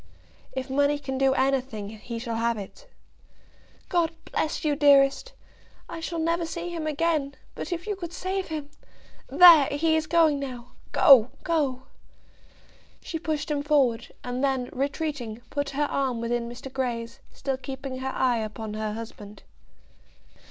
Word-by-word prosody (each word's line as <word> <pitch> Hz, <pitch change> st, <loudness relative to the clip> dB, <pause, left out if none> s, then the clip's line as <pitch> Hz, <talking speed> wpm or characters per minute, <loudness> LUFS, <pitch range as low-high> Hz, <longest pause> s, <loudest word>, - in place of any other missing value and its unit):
"If 260 Hz, 0 st, -4 dB
money 285 Hz, +2 st, +2 dB
can 265 Hz, -2 st, -4 dB
do 270 Hz, 0 st, +3 dB
anything, 260 Hz, -6 st, 0 dB
he 220 Hz, +2 st, -7 dB
shall 230 Hz, -1 st, -4 dB
have 230 Hz, 0 st, 0 dB
it." 210 Hz, -, -10 dB, 1.0 s
"God 340 Hz, -3 st, +1 dB, 0.2 s
bless 310 Hz, -, -1 dB
you, 295 Hz, -1 st, +2 dB
dearest! 280 Hz, -, +4 dB, 0.5 s
I 335 Hz, -, -7 dB
shall 330 Hz, +1 st, -4 dB
never 335 Hz, +1 st, 0 dB
see 340 Hz, +1 st, -4 dB
him 330 Hz, -2 st, -4 dB
again; 305 Hz, -2 st, 0 dB, 0.2 s
but -, -, -6 dB
if 345 Hz, 0 st, -3 dB
you 420 Hz, -1 st, -2 dB
could 345 Hz, -3 st, -7 dB
save 375 Hz, +2 st, -3 dB
him! 300 Hz, -2 st, -5 dB, 0.6 s
There; 340 Hz, -6 st, +8 dB
he 315 Hz, +3 st, +1 dB
is 315 Hz, -1 st, 0 dB
going 320 Hz, -4 st, +4 dB
now. 250 Hz, -3 st, -7 dB, 0.2 s
Go; 255 Hz, -4 st, +7 dB
go." 280 Hz, -6 st, 0 dB, 1.2 s
She 325 Hz, -, -4 dB
pushed 305 Hz, -1 st, -2 dB
him 290 Hz, -1 st, 0 dB
forward, 270 Hz, -6 st, +1 dB
and 250 Hz, +2 st, -3 dB
then 265 Hz, -3 st, 0 dB
retreating, 275 Hz, -4 st, -3 dB
put 285 Hz, -1 st, -2 dB
her 290 Hz, +2 st, 0 dB
arm 265 Hz, -4 st, -1 dB
within 235 Hz, 0 st, -2 dB
Mr. 250 Hz, +2 st, -9 dB
Grey's, 235 Hz, -3 st, -3 dB
still 270 Hz, -2 st, -3 dB
keeping 265 Hz, 0 st, -6 dB
her 265 Hz, 0 st, -3 dB
eye 250 Hz, -3 st, +1 dB
upon 215 Hz, 0 st, -5 dB
her 215 Hz, 0 st, -3 dB
husband. 215 Hz, -2 st, -9 dB
275 Hz, 150 wpm, -26 LUFS, 245-315 Hz, 1.2 s, There